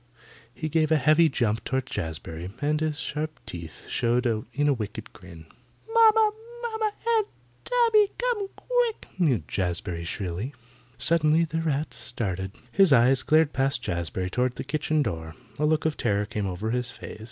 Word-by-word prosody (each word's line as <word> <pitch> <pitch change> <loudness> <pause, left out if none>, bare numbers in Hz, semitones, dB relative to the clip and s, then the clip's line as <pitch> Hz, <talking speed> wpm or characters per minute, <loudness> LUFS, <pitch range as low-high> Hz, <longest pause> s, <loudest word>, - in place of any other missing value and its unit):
He 155 +5 -4
gave 155 0 +1
a - - +6
heavy 155 +4 +5
jump 115 -6 0
toward 130 -1 -1
Jazbury, 80 - -5
and 150 +1 0
his 155 -2 -1
sharp 155 0 -4
teeth 85 -2 -9
showed 120 +2 +1 0.3
in 145 +1 +1
a 145 - +4
wicked 110 -2 -6
grin. 85 -5 -13 0.5
"Momma! 445 -1 +6 0.3
Momma! 440 -2 -1 0.3
Aunt 430 -2 +1 0.4
Tabby! 460 -4 +4
Come 485 -5 0
quick," - - -1
mewed 145 - +2
Jazbury 90 -2 -2
shrilly. 95 - -4 0.4
Suddenly 160 +3 +3
the 165 0 -2
rat 155 -1 -1
started. 95 -5 -3 0.2
His 195 +1 +5
eyes 125 +1 +5
glared 155 -1 +3
past 135 -1 +1
Jazbury 90 +1 -2
toward 125 +2 0
the - - -4
kitchen 150 +1 0
door. 80 -6 -4 0.2
A 150 - +3
look 155 0 +1
of 160 -1 0
terror 105 -2 +1
came 105 -1 -3
over 95 +5 -3
his 125 0 0
face. - - -8
135 Hz, 160 wpm, -26 LUFS, 100-160 Hz, 0.5 s, a